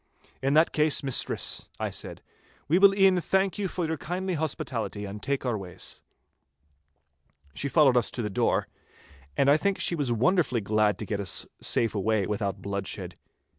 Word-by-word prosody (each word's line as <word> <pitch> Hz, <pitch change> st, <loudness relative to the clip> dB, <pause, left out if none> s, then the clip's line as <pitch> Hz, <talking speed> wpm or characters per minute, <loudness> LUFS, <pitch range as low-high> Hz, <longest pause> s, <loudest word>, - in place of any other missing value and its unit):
'In 135 Hz, +2 st, +1 dB
that 160 Hz, +2 st, +5 dB
case, 150 Hz, -1 st, +2 dB
mistress,' 135 Hz, -2 st, 0 dB
I -, -, -2 dB
said, -, -, -8 dB, 0.4 s
'we 165 Hz, +6 st, +3 dB
will 195 Hz, 0 st, +6 dB
e'en 190 Hz, -2 st, +4 dB
thank 190 Hz, +3 st, 0 dB
you 200 Hz, -, 0 dB
for 180 Hz, -1 st, -3 dB
your 160 Hz, 0 st, -2 dB
kindly 180 Hz, +5 st, -3 dB
hospitality 130 Hz, -9 st, -3 dB
and 100 Hz, +1 st, -7 dB
take 140 Hz, +1 st, -2 dB
our 120 Hz, -3 st, 0 dB
ways.' 95 Hz, -4 st, -6 dB, 1.5 s
She 140 Hz, -, -3 dB
followed 140 Hz, -4 st, +4 dB
us 120 Hz, -2 st, +2 dB
to 120 Hz, -, -4 dB
the 105 Hz, -, -2 dB
door, -, -, +1 dB, 0.7 s
and 140 Hz, -, +3 dB
I 145 Hz, +2 st, +6 dB
think 200 Hz, +4 st, 0 dB
she -, -, +1 dB
was 145 Hz, -7 st, -1 dB
wonderfully 130 Hz, -, +2 dB
glad 105 Hz, -1 st, +1 dB
to 105 Hz, -, -5 dB
get 105 Hz, 0 st, -3 dB
us 95 Hz, -4 st, 0 dB
safe 115 Hz, -, +1 dB
away 105 Hz, 0 st, 0 dB
without 100 Hz, -1 st, -3 dB
bloodshed. 100 Hz, -1 st, -4 dB
135 Hz, 170 wpm, -27 LUFS, 105-170 Hz, 1.5 s, will